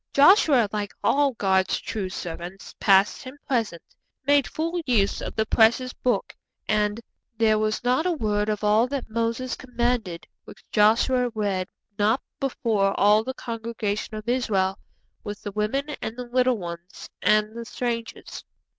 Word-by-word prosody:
Joshua, 285 - +6
like 205 -2 -4
all 280 -1 +3
God's 190 -3 +1
true 200 -4 -4
servants 175 +1 -7
past 195 0 +4
and 260 +3 -9
present, 225 -10 -1 0.4
made 285 -1 +4
full 335 +2 -2
use 210 -6 +2
of - - -6
the 220 - +1
precious 235 +4 +3
Book, 245 -6 -1 0.3
and, 210 +1 +1 0.4
'_There 220 -2 +3
was 215 +1 -1
not 255 +8 +2
a - - +2
word 210 -8 0
of 215 0 -2
all 215 +3 +4
that 265 -4 -5
Moses 230 +3 -1
commanded, 240 -8 -2 0.2
which - - -14
Joshua 240 +4 +3
read 195 -4 -1 0.3
not 215 +5 +3 0.2
before 220 -7 0
all 210 +2 +5
the 260 +2 -5
congregation 225 -2 -4
of 215 +1 -7
Israel, 200 -6 0 0.4
with 205 -1 -7
the 205 - -4
women, 215 +8 -1
and 220 +2 -5
the 250 - -4
little 250 0 +2
ones, 170 0 -8
and 215 +1 +2
the 235 - -5
strangers. 230 -1 -5
220 Hz, 150 wpm, -25 LUFS, 205-250 Hz, 0.4 s, Joshua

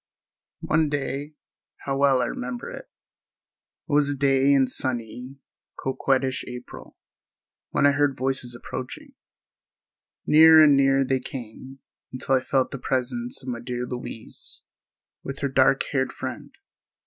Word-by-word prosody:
One 155 -1 +1
day—how 145 -1 -6
well 135 -2 +3
I - - 0
remember 125 -1 -5
it!—it - - -9 1.0
was 145 0 +2
a 145 - -1
day 135 0 +3
in 135 -2 +5
sunny, 125 0 -5 0.4
coquettish 130 0 0
April—when 125 +3 -7
I 145 - +6
heard 145 -1 +1
voices 130 -2 -2
approaching. - - -8 1.1
Nearer 160 +1 +8
and 145 -2 +6
nearer 135 0 +3
they 130 0 +1
came, 130 +1 -9 0.3
until 130 +1 -2
I 130 - +5
felt 130 0 0
the 135 - -6
presence 125 -1 -2
of 130 - -6
my 120 -1 -3
dear 125 +1 -4
Louise 120 -2 -8 0.6
with 135 - -6
her 140 - +1
dark 135 0 +3
haired 130 -2 0
friend. - - -6
135 Hz, 125 wpm, -24 LUFS, 125-140 Hz, 1.1 s, Nearer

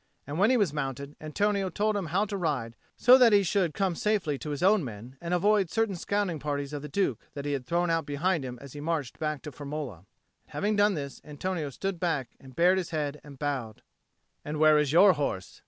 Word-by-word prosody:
And 145 +4 -4
when 205 +3 +5
he 255 - +4
was 200 -10 +1
mounted, 140 0 -4
Antonio 195 +5 0
told 210 +4 0
him 195 -4 -2
how 190 +7 +1
to 205 -1 -5
ride, 140 -11 -2 0.2
so 255 +1 +7
that 235 -4 +6
he 200 -1 +6
should 180 -3 0
come 195 -3 +1
safely 170 -7 0
to 150 - -6
his 145 +2 -3
own 195 -1 +4
men, 120 +1 -8
and 170 0 -4
avoid 195 +1 +3
certain 225 0 0
scouting 190 -2 -1
parties 145 0 -3
of 145 - -4
the 150 - -7
Duke 140 - 0 0.2
that 140 -1 -5
he 145 - -1
had 130 -3 -4
thrown 175 0 +1
out 165 -2 0
behind 155 +2 0
him 125 -1 -6
as 140 - -11
he 145 - -7
marched 155 -5 -3
back 155 -2 -2
to 150 - -6
Firmola. 145 - -6
And 85 - -23 0.4
having 210 +1 -1
done 205 -1 +3
this, 140 -3 -6
Antonio 155 +1 -3
stood 190 +6 -4
back 160 -8 -1
and 130 -2 -15
bared 180 +4 +4
his 180 - -4
head 150 -3 -3
and 145 -2 -12
bowed. 135 -7 -3 0.6
"And 150 +1 -4
where 155 -1 +6
is 150 -2 +1
your 185 +4 +7
horse?" 140 - -3
155 Hz, 230 wpm, -28 LUFS, 140-195 Hz, 0.6 s, so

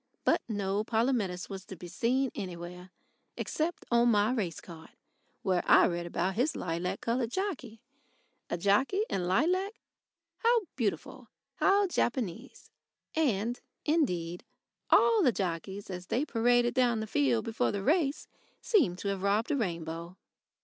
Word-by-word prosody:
But - - +3
no 205 -1 -1
Polumetis 220 -6 0
was 195 -2 -7
to 190 - -9
be 175 +1 -9
seen 250 +8 0
anywhere 180 -1 -7 0.5
except 325 +3 -2
on 235 0 +5
my 210 0 +3
race 190 -10 -2
card, 160 -2 -12 0.5
where 185 -3 +2
I - - +8
read 170 -1 -2
about 175 +2 -1
his 255 +10 0
lilac 170 +1 -3
coloured 235 0 0
jockey. 260 - -4 0.7
A - - -1
jockey 210 - +2
in 180 -2 -1
lilac 360 - +1 0.7
how 470 0 +4
beautiful, 225 -6 -3 0.3
how 400 +1 +4
Japanese! 240 - -3 0.4
And, 240 -6 0 0.2
indeed, 180 - 0 0.5
all 455 -2 +5
the 270 -9 +5
jockeys 190 0 -4
as 180 0 -7
they 260 +6 0
paraded 240 -1 +2
down 245 -3 +2
the 220 - -2
field 135 - +1
before 225 - 0
the 200 -1 -3
race 300 - +1 0.3
seemed 285 - +2
to 200 - -3
have 195 -1 -2
robbed 205 +6 +1
a - - +2
rainbow. 170 - -4
215 Hz, 140 wpm, -30 LUFS, 180-260 Hz, 0.7 s, I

